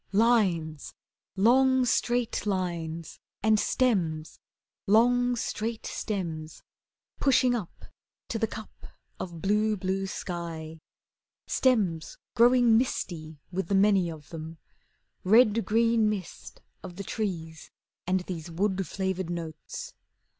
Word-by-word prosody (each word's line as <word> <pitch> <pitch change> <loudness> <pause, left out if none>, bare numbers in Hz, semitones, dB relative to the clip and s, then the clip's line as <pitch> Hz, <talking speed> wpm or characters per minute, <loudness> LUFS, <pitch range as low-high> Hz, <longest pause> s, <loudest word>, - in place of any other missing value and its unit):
Lines 190 -9 +2 0.4
long, 260 +5 +4
straight 240 -2 0
lines! 170 -4 -3 0.2
And 215 -1 +4
stems, 170 -13 0 0.5
Long, 245 +4 +4
straight 225 -1 -3
stems 165 -7 -4 0.6
Pushing 255 -2 +4
up 215 -8 -5 0.4
To 225 - -2
the 225 - +1
cup 220 0 -10 0.3
of 170 -3 -7
blue, 210 +2 +2
blue 190 +1 -2
sky. 165 -4 -6 0.7
Stems 200 -11 +1 0.2
growing 240 -1 +5
misty 160 - -3
With 185 -1 -2
the 200 - +1
many 195 -3 +4
of 155 -3 -10
them, 160 0 -7 0.7
Red 220 +2 +5
green 230 0 +3
mist 200 -5 -6 0.2
Of 180 -2 -9
the 200 - -6
trees, 170 -6 -4 0.4
And 185 0 +2
these 175 -2 -6
Wood 190 +2 -1
flavoured 190 -2 -2
notes. 175 - -6
195 Hz, 110 wpm, -28 LUFS, 170-230 Hz, 0.7 s, growing